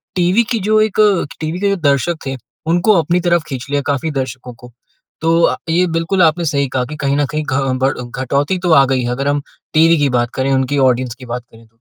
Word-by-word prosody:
TV 185 Hz, +5 st, +3 dB
की 230 Hz, -, +1 dB
जो 215 Hz, 0 st, +4 dB
एक 215 Hz, -1 st, -1 dB
अ, 205 Hz, -4 st, +3 dB, 0.2 s
टीवी 160 Hz, +3 st, -3 dB
के 200 Hz, 0 st, +1 dB
दर्शक 155 Hz, 0 st, +1 dB
थे, 135 Hz, -, -3 dB, 0.3 s
उनको 175 Hz, +5 st, +3 dB
अपनी 175 Hz, +2 st, 0 dB
तरफ 170 Hz, -2 st, +1 dB
खींच 130 Hz, -2 st, -5 dB
लिया 145 Hz, 0 st, +1 dB
काफ़ी 145 Hz, +3 st, -2 dB
दर्शकों 130 Hz, -2 st, -5 dB
को। 120 Hz, +1 st, -15 dB, 0.5 s
तो 165 Hz, +1 st, +2 dB
अ, -, -, +3 dB
ये 175 Hz, +3 st, +3 dB
बिल्कुल 175 Hz, +3 st, 0 dB
आपने 165 Hz, +1 st, +2 dB
सही 140 Hz, -3 st, 0 dB
कहा 125 Hz, -1 st, -1 dB
कि 150 Hz, -, -8 dB
कहीं 140 Hz, -, +1 dB
न 145 Hz, -, +2 dB
कहीं 155 Hz, -, -1 dB
घ 135 Hz, -1 st, 0 dB
बढ़ 135 Hz, -, -1 dB
घटौती 140 Hz, +8 st, -1 dB
तो 175 Hz, -1 st, -1 dB
आ 135 Hz, -3 st, +6 dB
गई 130 Hz, -1 st, 0 dB
है। -, -, -2 dB
अगर 140 Hz, +3 st, -2 dB
हम 145 Hz, 0 st, 0 dB, 0.3 s
टीवी 165 Hz, +1 st, +5 dB
की 145 Hz, -2 st, +1 dB
बात 120 Hz, 0 st, -1 dB
करें, 130 Hz, +1 st, 0 dB
उनकी 130 Hz, +1 st, 0 dB
ऑडियंस 125 Hz, -1 st, -2 dB
की 130 Hz, -2 st, -12 dB
बात 125 Hz, 0 st, -5 dB
करें। 115 Hz, 0 st, -18 dB
145 Hz, 235 wpm, -16 LUFS, 130-170 Hz, 0.5 s, आ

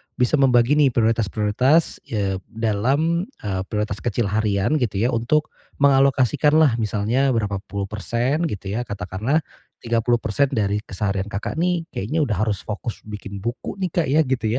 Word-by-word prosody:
bisa 125 Hz, +4 st, +2 dB
membagi 130 Hz, +1 st, +4 dB
nih 145 Hz, -, +6 dB
prioritas-prioritas, 115 Hz, -, +2 dB
eee, 100 Hz, -4 st, -1 dB
dalam, 130 Hz, -, 0 dB, 0.2 s
eee, 95 Hz, -3 st, -2 dB
prioritas 105 Hz, -1 st, -2 dB
kecil 115 Hz, -2 st, -1 dB
harian 105 Hz, +5 st, +1 dB
gitu 105 Hz, -5 st, -1 dB
ya 120 Hz, -, +3 dB
untuk 125 Hz, +7 st, 0 dB, 0.3 s
mengalokasikanlah 140 Hz, 0 st, +4 dB
misalnya 115 Hz, +5 st, +1 dB
berapa 100 Hz, -3 st, -1 dB
puluh 100 Hz, 0 st, -3 dB
persen 120 Hz, -, -1 dB
gitu 100 Hz, -, -5 dB
ya. 120 Hz, +3 st, -3 dB
Katakanlah 105 Hz, -, -1 dB, 0.4 s
30% 115 Hz, +2 st, +1 dB
dari 105 Hz, -3 st, +1 dB
keseharian 95 Hz, 0 st, -2 dB
Kakak 105 Hz, +9 st, -4 dB
nih 175 Hz, -1 st, +1 dB
kayaknya 150 Hz, +11 st, -1 dB
udah 110 Hz, -9 st, -1 dB
harus 105 Hz, -2 st, -1 dB
fokus 110 Hz, +1 st, -5 dB
bikin 100 Hz, -2 st, -8 dB
buku 120 Hz, -, -4 dB
nih, 180 Hz, -, -1 dB
Kak, 170 Hz, -3 st, 0 dB
ya 150 Hz, +4 st, +4 dB
gitu 130 Hz, -4 st, -2 dB
115 Hz, 150 wpm, -22 LUFS, 105-140 Hz, 0.4 s, nih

